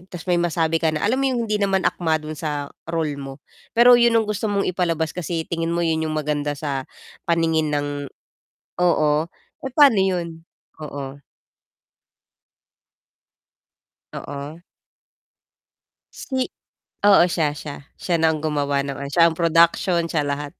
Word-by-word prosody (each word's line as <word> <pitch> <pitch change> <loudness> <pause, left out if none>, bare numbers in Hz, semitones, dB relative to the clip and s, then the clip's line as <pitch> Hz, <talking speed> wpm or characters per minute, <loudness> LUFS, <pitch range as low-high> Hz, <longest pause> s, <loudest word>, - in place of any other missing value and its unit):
'tas 180 -2 -9
may 175 -2 +1
masabi 165 -1 0
ka 165 - +2
na 155 +2 -1
alam 255 +6 +1
mo 270 - +2
yung 245 -2 -1
hindi 210 -1 -1
naman 195 -2 +1
akma 160 -3 +1
dun 155 0 -6
sa 150 -2 -4 0.2
role 160 -3 -2
mo? 135 0 -9 0.3
Pero 245 +1 +8
yun 235 -1 +4
ang 225 - +3
gusto 210 +1 -2
mong 200 -1 0
ipalabas 165 -3 -1
kasi 170 -2 -3
tingin 165 0 -2
mo 170 0 0
yun 160 -1 0
yung 155 - -3
maganda 145 -1 -2
sa 140 -3 -4 0.4
paningin 165 -2 +2
ng 145 -1 -1 1.0
oo, 155 -3 +3 0.5
eh, 265 - -4
pano 275 -8 +6
yun? 170 -4 -2 0.4
Oo. 140 -1 -7 2.9
Oo. 145 +3 -7 1.7
Si? 260 -1 -1 0.5
Oo, 200 -4 +7
siya 160 -4 0
siya 145 -1 -8 0.2
siya 175 -2 0
na 160 0 +3
ang 155 - -4
gumawa 145 -2 0
ng 140 -1 -4
ano, 140 0 -6
siya 170 +2 +6
ang 160 - -4
production 170 +1 +3
siya 155 -3 0
lahat. 145 0 -3
165 Hz, 150 wpm, -22 LUFS, 150-180 Hz, 2.9 s, Pero